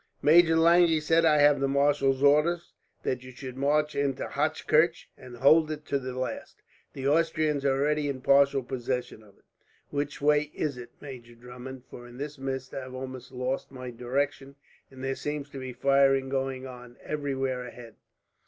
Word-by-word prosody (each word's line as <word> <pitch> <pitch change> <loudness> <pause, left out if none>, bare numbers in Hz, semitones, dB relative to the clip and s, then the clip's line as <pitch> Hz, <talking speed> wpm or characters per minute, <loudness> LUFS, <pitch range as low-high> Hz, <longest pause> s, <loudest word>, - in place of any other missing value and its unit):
"Major 165 +2 +6
Lange," 170 +2 +6
he 160 -1 +2
said, 165 +2 +2
"I 155 -2 +5
have 145 0 +5
the 135 - +1
marshal's 140 -1 +2
orders 155 +4 +3 0.3
that 125 -1 -2
you 130 - -11
should 130 0 -9
march 150 +3 +1
into 140 -2 -1
Hochkirch, 155 +2 +1
and 125 -1 -12
hold 155 +5 +5
it 155 -1 -6
to 140 - -1
the 130 -1 -6
last. 130 -3 -5 0.3
The 135 0 -3
Austrians 155 -1 +1
are 135 -1 +2
already 150 0 +1
in 130 -2 -4
partial 140 0 +4
possession 125 -2 -4
of 105 -2 -20
it." - - -30 0.5
"Which 145 0 -3
way 150 +1 +3
is 150 -3 -2
it, 125 -1 -9
Major 125 -4 -10
Drummond? 125 +2 -10
For 120 0 -10
in 120 0 -13
this 145 +1 -6
mist 130 -1 -5
I - - -3
have 130 0 -9
almost 130 -1 -8
lost 130 +1 -3
my 130 -2 -7
direction, 135 +3 -3 0.3
and 130 -1 -12
there 135 0 -1
seems 150 0 -5
to 135 - -7
be 130 -1 -6
firing 135 +1 +3
going 135 -1 -2
on 125 -1 -11
everywhere 135 -4 -2
ahead." 120 -2 -11
135 Hz, 180 wpm, -27 LUFS, 130-150 Hz, 0.5 s, Major